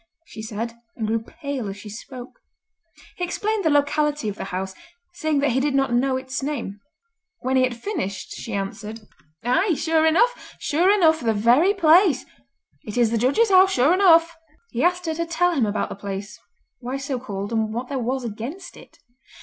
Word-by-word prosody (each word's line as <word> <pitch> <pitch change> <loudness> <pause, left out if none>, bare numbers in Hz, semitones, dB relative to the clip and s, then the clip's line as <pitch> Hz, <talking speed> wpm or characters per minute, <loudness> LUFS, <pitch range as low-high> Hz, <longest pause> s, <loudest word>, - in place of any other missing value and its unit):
she 220 - -10
said, 225 +2 -4 0.2
and 220 - -3
grew 225 +1 0
pale 260 -1 -5
as 195 - -7
she 205 - -11
spoke. 245 - -10 0.8
He 360 - -3
explained 415 +4 -1
the 320 - +3
locality 290 -3 +1
of 200 - -5
the - - -6
house, 190 +1 -4 0.4
saying 310 -4 0
that 285 -2 +2
he 255 - +1
did 280 0 0
not 270 -3 +1
know 260 +2 +2
its 260 +1 -4
name. 265 -8 -4 0.6
When 260 +1 0
he 260 - +4
had 255 -2 0
finished 200 - -4
she 230 - -7
answered: 210 +3 -5 0.4
"Aye, 320 - +2
sure 320 +1 +2
enough—sure 355 -3 +1
enough 325 -6 +4
the 225 -2 0
very 250 - +4
place! 335 -4 +4 0.6
It 210 - -6
is 235 -2 +3
the 230 - +1
Judge's 390 - +2
House 380 0 +6
sure 270 +7 +4
enough." 335 -3 +5 0.4
He 240 - -1
asked 355 +1 +1
her 320 - -1
to 335 +1 -2
tell 345 +2 +2
him 255 -9 +1
about 205 - -1
the - - -6
place, 200 +1 -6 0.4
why 255 +2 -4
so 270 -2 -3
called, 205 -4 -5
and 220 -1 0
what 240 +3 -4
there 275 -2 -2
was 255 +2 -2
against 235 - -7
it. - - -16
265 Hz, 190 wpm, -23 LUFS, 225-325 Hz, 0.8 s, House